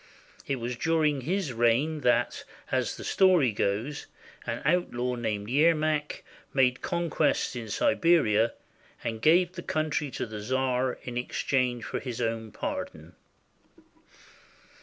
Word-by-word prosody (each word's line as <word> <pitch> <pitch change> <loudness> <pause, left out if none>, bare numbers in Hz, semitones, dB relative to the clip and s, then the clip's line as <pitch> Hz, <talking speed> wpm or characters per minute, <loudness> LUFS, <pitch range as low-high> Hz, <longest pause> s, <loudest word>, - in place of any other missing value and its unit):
It 140 - 0
was 120 0 -4
during 155 0 +1
his 170 0 -1
reign 120 +7 +2
that, 125 - +1 0.3
as - - 0
the - - -8
story 180 - +4
goes, 110 +7 -2 0.4
an - - -3
outlaw 125 -7 +1
named 110 -4 -3
Yermak 155 +2 +1 0.3
made 125 -2 +3
conquests 170 -6 0
in 115 -2 -6
Siberia, 165 - +3 0.5
and 110 -1 -3
gave 175 +5 +4
the 180 - -7
country 155 -3 -1
to - - -4
the 110 -2 -7
czar 130 +2 0
in 120 -1 -5
exchange 125 -1 -1
for - - -3
his 125 -4 -6
own 115 -2 -2
pardon. - - -5
130 Hz, 125 wpm, -28 LUFS, 120-155 Hz, 0.5 s, story